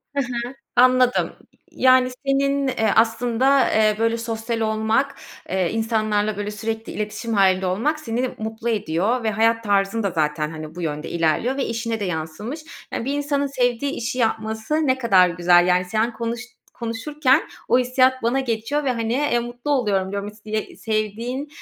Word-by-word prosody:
He 280 - +2
he. 255 - -3 0.5
Anladım. 255 0 +4 0.4
Yani, 255 -1 +4 0.2
senin, 275 0 +1
eee, 225 -4 +1
aslında, 235 +4 +3
eee, 215 -1 +3
böyle 230 +1 +1
sosyal 230 0 -3
olmak, 220 +5 +1 0.3
eee, 185 -2 0
insanlarla 215 -2 0
böyle 205 0 -3
sürekli 220 +2 -4
iletişim 215 +2 -4
hâlinde 190 -2 +3
olmak 235 +13 0
seni 250 -1 -2
mutlu 220 +1 -4
ediyor 210 +3 0
ve 220 - +2
hayat 225 +2 +2
tarzın 200 +2 +1
da 200 - 0
zaten, 150 -2 -1
hani, 155 -1 -8
bu 175 - -6
yönde 150 -1 -3
ilerliyor 170 - +1
ve 275 - 0
işine 230 -1 -3
de - - -1
yansımış. 180 - -4 0.3
E, - - -2
bir 275 +3 -1
insanın 285 -1 0
sevdiği 255 0 0
işi 240 +2 -3
yapması 220 +2 -1
ne 260 -1 +2
kadar 190 -7 +5
güzel, 175 0 +4
yani. 180 0 +3
Sen 220 +5 0
konuş 235 0 -4 0.3
konuşurken 255 +4 +1 0.3
o - - +5
hissiyat 255 +1 +2
bana 240 +4 +1
geçiyor 255 +4 -2
ve 260 - +1
hani, 230 -1 -2
eee, 265 -2 +1
mutlu 240 +4 -5
oluyorum. 205 -9 +1
Diyorum 200 0 -4
istiye 215 +1 -5
sevdiğin, 225 +6 -3
225 Hz, 165 wpm, -22 LUFS, 205-255 Hz, 0.5 s, kadar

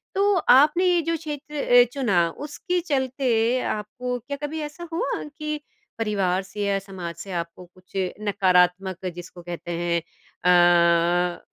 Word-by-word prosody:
तो 400 +1 +3 0.2
आपने 300 +7 +4
ये 350 -2 +3
जो 330 +1 -1
क्षेत्र 300 -1 -7 0.3
अ, - - +8
चुना 195 -11 +2 0.2
उसके 360 +5 -2
चलते 255 -5 +1
आपको 245 +4 -3
क्या 280 +4 -6
कभी 305 +2 -4
ऐसा 310 +4 -7
हुआ 400 +7 -2
कि, 300 0 -5 0.4
परिवार 195 -4 0
से 205 +2 -8
या 200 -1 +1
समाज 185 -4 -7
से 195 - -9
आपको 170 +1 -5
कुछ 185 +2 -24 0.3
नकारात्मक 185 -2 +2
जिसको 175 0 -10
कहते 175 0 -7
हैं 170 0 0
अ 175 0 +2
205 Hz, 140 wpm, -24 LUFS, 180-295 Hz, 0.4 s, अ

